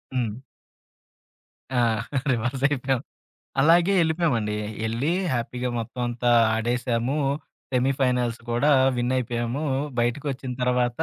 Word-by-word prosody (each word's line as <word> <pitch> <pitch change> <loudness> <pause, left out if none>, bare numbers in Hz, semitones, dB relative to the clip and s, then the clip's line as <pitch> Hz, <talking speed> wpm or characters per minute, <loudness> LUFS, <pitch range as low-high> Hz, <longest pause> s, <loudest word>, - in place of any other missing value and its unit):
హ్మ్. 115 -4 -1 1.4
ఆ! - - +3 0.5
రివర్స్ 125 +3 -1
అయిపోయాం. 135 -3 -1 0.6
అలాగే 170 +6 +5
ఎళ్ళిపోయామండి. 155 -11 0 0.3
ఎళ్ళి 120 +8 0 0.2
హ్యాపీగా 125 +1 -2
మొత్తమంతా 120 +1 -2 0.3
ఆడెసాము. 120 +3 0 0.6
సెమీఫైనల్స్ 125 -2 +1
కూడా 140 +6 +3 0.3
విన్నయిపోయాము. 120 +2 -1 0.4
బయటకొచ్చిన 130 +2 -2
తర్వాత 125 -1 +1
125 Hz, 80 wpm, -25 LUFS, 120-135 Hz, 1.4 s, అలాగే